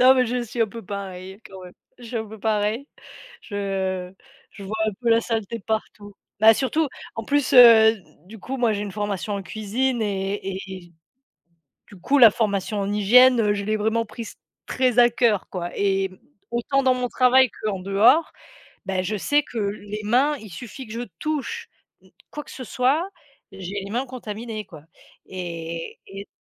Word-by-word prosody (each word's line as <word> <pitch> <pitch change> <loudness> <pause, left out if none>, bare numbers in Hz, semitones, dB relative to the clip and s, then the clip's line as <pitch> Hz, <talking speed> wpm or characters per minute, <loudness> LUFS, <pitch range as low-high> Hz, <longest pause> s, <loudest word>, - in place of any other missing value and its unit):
Non, 255 +1 +8
mais 255 -2 +2
je 245 +1 -1
suis 235 +1 -6
un - - +1
peu 230 +3 -9
pareille 190 0 -7
quand 190 -1 -11
même. 180 - -12 0.3
Je 245 - -13
suis 235 +1 -5
un 220 -1 -3
peu 220 +1 -11
pareille. 215 +5 -1 0.6
Je 190 -3 -3 0.4
je 200 - -11
vois 205 +3 -5
un - - 0
peu 235 - +1
la 230 0 +4
saleté 225 -1 -3
partout. 210 -1 -4 0.3
Bah, 220 +1 +8
surtout 290 +5 0 0.3
en 225 - -4
plus, 285 +3 0
heu, 230 -3 +9
d 195 - -16 0.2
du 215 +3 -12
coup 265 +6 -5
moi 235 -3 +2
j'ai 205 - -3
une 205 - -5
formation 205 0 -3
en 200 -1 -4
cuisine 230 +5 -2
et 195 -1 -1
et 190 - -3
et 180 -2 -10 0.9
du 200 - -14
coup, 285 +7 +2
la 230 -5 +9
formation 205 -1 -1
en 200 0 -2
hygiène, 240 +5 +6
heu, 210 -2 +2
je 200 -1 -3
l'ai 215 +1 0
vraiment 220 +2 0
prise 215 +1 -9 0.3
très 255 -2 0
à 240 0 +7
cœur 230 -4 +1
quoi 175 -2 -4
et 195 -1 +1 0.4
autant 255 +4 0
dans 260 -1 +4
mon 250 0 -1
travail 255 0 +4
que 215 - -4
en 195 - -3
dehors, 220 - +3 0.5
beh 190 -1 -1
je 210 +3 -2
sais 290 +9 +2
que 245 - -13
les 205 0 -4
mains, 260 +8 +2
il 215 -6 -12
suffit 245 +8 -9
que 215 - -10
je 230 - -4 0.2
touche 310 - -3 0.6
quoi 295 -1 -7
que - - -14
ce 255 - -7
soit, 270 - +1 0.4
j'ai 195 +1 -5
les 200 - -8
mains 245 +5 -1
contaminées 225 -3 -6
quoi 155 -4 -13 0.4
et 170 -2 -6
et 195 +1 -9
215 Hz, 190 wpm, -23 LUFS, 195-245 Hz, 0.9 s, heu